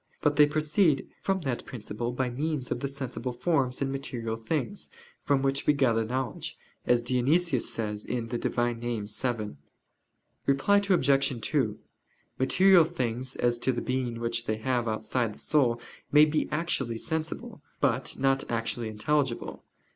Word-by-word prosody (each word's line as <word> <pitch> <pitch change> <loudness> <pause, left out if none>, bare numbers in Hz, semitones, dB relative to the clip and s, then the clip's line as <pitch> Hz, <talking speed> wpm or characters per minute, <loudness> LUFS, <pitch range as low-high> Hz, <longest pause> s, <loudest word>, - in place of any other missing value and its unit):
But 150 -1 +3
they 150 0 +7
proceed 155 +1 +2
from 190 -1 0
that 135 -6 -2
principle 120 0 -4
by 125 0 -1
means 145 0 -2
of - - 0
the 140 - -2
sensible 130 -2 -4
forms 135 -2 0
and 135 - -1
material 120 -4 -3
things, 150 - -3 0.3
from 140 -2 +1
which 135 +1 0
we 150 - +6
gather 120 -5 +2
knowledge, 125 +1 -3 0.3
as 120 -1 +3
Dionysius 130 +3 +2
says 105 -2 -3
(Div. 120 -2 -3 0.3
Nom. 120 -2 -1
vii). 110 0 -1 1.0
Reply 140 +9 +4
Obj. 135 -7 +3
2: 110 -3 0 0.6
Material 185 +6 +6
things, 130 -6 -3
as 120 -1 +1
to 130 - +1
the 120 - -2
being 125 -2 -2
which 115 0 -1
they 110 - 0
have 120 +1 0
outside 110 +1 -1
the - - -17
soul, 125 -6 +2 0.3
may 150 +1 +8
be 155 0 0
actually 140 -7 -1
sensible, 160 - -4 0.2
but 125 +2 +1
not 135 0 +2
actually 115 0 -2
intelligible. 130 +4 -1
130 Hz, 145 wpm, -28 LUFS, 120-145 Hz, 1.0 s, may